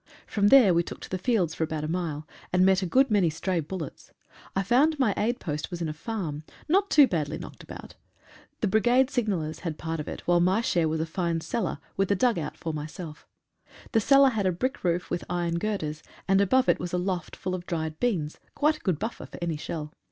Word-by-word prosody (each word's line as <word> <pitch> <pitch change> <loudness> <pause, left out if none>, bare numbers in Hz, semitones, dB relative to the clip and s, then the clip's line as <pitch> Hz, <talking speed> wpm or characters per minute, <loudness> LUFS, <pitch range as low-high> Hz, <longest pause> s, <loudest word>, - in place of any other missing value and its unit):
From 205 -1 +1
there 225 -6 +7
we 170 - +4
took - - -7
to - - -8
the 185 - -2
fields 185 -6 +1
for 160 - -2
about 155 -1 -3
a - - -2
mile, 160 -3 -3 0.2
and 180 0 +4
met 190 0 +4
a 185 - -1
good 265 +6 +3
many 195 -5 +4
stray 175 +3 -1
bul 170 +4 -4
lets. 155 - -9 0.4
I 195 - +1
found 275 - +3
my 250 -7 +2
aid 240 +3 0
post 150 -3 -4
was 175 - -5
in 165 - -2
a 155 - -3
farm, 160 -3 -4 0.3
not 390 +5 +3
too 295 -2 +7
badly 155 - -2
knocked - - -10
about. - - -10 0.7
The 215 - +2
Brigade 245 +6 +3
signallers 195 - -1
had 165 -4 -4
part 165 0 -4
of 150 - -5
it, - - -6
while 175 0 +3
my 185 +4 +3
share 170 -8 +1
was 160 0 -1
a - - 0
fine 170 0 -1
cellar, 235 +7 -2 0.2
with 195 -1 +1
a 200 - +3
dugout 185 -8 0
for 160 - -4
myself. 155 +1 -7 0.6
The 225 -4 +3
cellar 275 +4 +6
had 215 -6 0
a - - +3
brick 255 +10 -3
roof 175 0 0
with 175 - -1
iron 170 -1 -1
girders, 165 -7 -3 0.3
and 195 +1 +4
above 255 +6 +3
it - - +3
was 175 0 -5
a - - +2
loft 180 -2 -2
full 185 - -4
of 180 -1 -5
dried 160 -2 -3
beans, 175 -11 -1
— - - -37
quite 305 +1 +2
a - - -21
good 185 -6 0
buffer 220 +8 -5
for - - -10
any 170 -2 -2
shell. 150 0 -5
180 Hz, 235 wpm, -27 LUFS, 160-220 Hz, 0.7 s, there